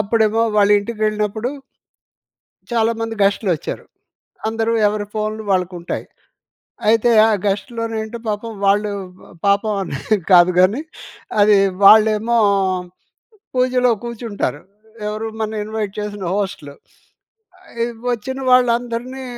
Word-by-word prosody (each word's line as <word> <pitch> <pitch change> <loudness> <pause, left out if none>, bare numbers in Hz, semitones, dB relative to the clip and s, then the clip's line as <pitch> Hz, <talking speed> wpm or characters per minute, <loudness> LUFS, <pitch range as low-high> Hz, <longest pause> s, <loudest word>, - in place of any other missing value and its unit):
అప్పుడేమో 220 +1 +2
వాళ్ళ 205 0 +4
ఇంటికెళ్ళినప్పుడు... 215 +1 -2 1.2
చాలామంది 225 0 0
గెస్ట్‌లోచ్చారు. 195 -4 -1 0.6
అందరూ 225 +1 -1 0.2
ఎవరి 205 0 -2
ఫోన్‌లు 215 0 -3
వాళ్ళకుంటాయి. 180 -2 -2 0.8
అయితే, 230 +2 +4 0.2
ఆ - - +2 0.2
గెస్ట్‌లోని 225 +3 -2
ఏంటో 220 +2 -7
పాపం 210 +2 -3
వాళ్ళు, 205 +2 +2 0.3
వ - - -20 0.2
పాపం 200 +2 +2
అని 140 -7 -4 0.3
కాదు 180 0 +7
గానీ 200 +10 +3 0.6
అది 205 0 +6 0.3
వాళ్ళేమో 220 +3 +6 1.2
పూజలో 250 -1 +2
కూర్చుంటారు. 225 -10 -4 0.5
ఎవరు 215 +1 -3
మన 220 0 -2
ఇన్వైట్ 215 -2 -4
చేసిన 205 -2 -5
హోస్ట్‌లు. 190 -8 -4 0.9
ఆహ్, 235 0 -4 0.2
వచ్చిన 255 +3 -3
వాళ్ళందరినీ 245 +1 +1
215 Hz, 100 wpm, -19 LUFS, 205-230 Hz, 1.2 s, కాదు